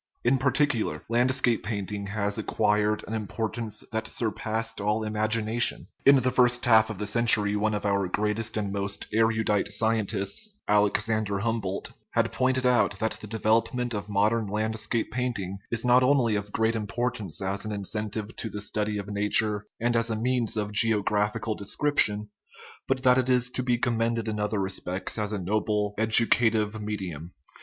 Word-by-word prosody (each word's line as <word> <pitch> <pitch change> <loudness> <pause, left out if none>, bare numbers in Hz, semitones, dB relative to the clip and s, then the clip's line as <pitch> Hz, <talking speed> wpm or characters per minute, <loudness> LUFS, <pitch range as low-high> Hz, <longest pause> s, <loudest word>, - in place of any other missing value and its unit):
In 130 +2 +2
par 140 +1 +2
ticular, 145 -7 0
landscape 120 0 +2
painting 100 0 -4
has 100 0 -2
acquired 105 0 0
an 110 - -5
importance 110 +1 -3
that 110 0 -3
surpassed 110 -1 -2
all 105 +2 0
imagination. 110 +2 +1 0.2
In 140 - +9
the 130 -1 +2
first 125 -1 +2
half 110 -2 +5
of 110 - -6
the 105 - -4
century 105 -2 +3
one 105 +1 0
of 105 - -4
our 100 -1 +1
greatest 105 +3 -2
and 100 -2 -2
most 100 0 -3
erudite 110 -2 +1
scientists, 110 - -1
Alexander 105 0 +1
Humboldt, 110 -4 -2 0.2
had - - +1
pointed 130 0 0
out 120 -5 +2
that 110 +2 -2
the 105 - -8
devel 110 +1 +2
opment 125 -1 -4
of 105 0 -5
modern 105 +2 +1
landscape 110 +2 -1
painting 105 -7 -3
is 115 +1 -1
not 125 +1 +5
only 125 -4 +3
of 105 0 -4
great 110 +1 0
importance 115 -4 -3
as 95 0 -2
an 110 - -4
incentive 105 +1 -4
to 110 - -4
the 105 - -6
study 105 0 -2
of 100 0 -5
nature 105 +1 +1
and 120 +1 0
as 115 0 +2
a 110 - -1
means 120 0 0
of 105 -1 -2
geographical 105 +1 +2
description, 105 -2 +1 0.6
but 135 -1 -1
that 125 0 +5
it 130 0 0
is 125 -1 +3
to 130 - -2
be 125 -1 0
commended 115 -1 -1
in 105 -1 -3
other 105 +1 -1
respects 95 +1 -2
as 105 0 -2
a 105 - -2
noble 105 +2 -1
edu 110 +1 +7
cative 110 -2 +1
medium. 95 -6 -6
110 Hz, 170 wpm, -26 LUFS, 105-115 Hz, 0.6 s, In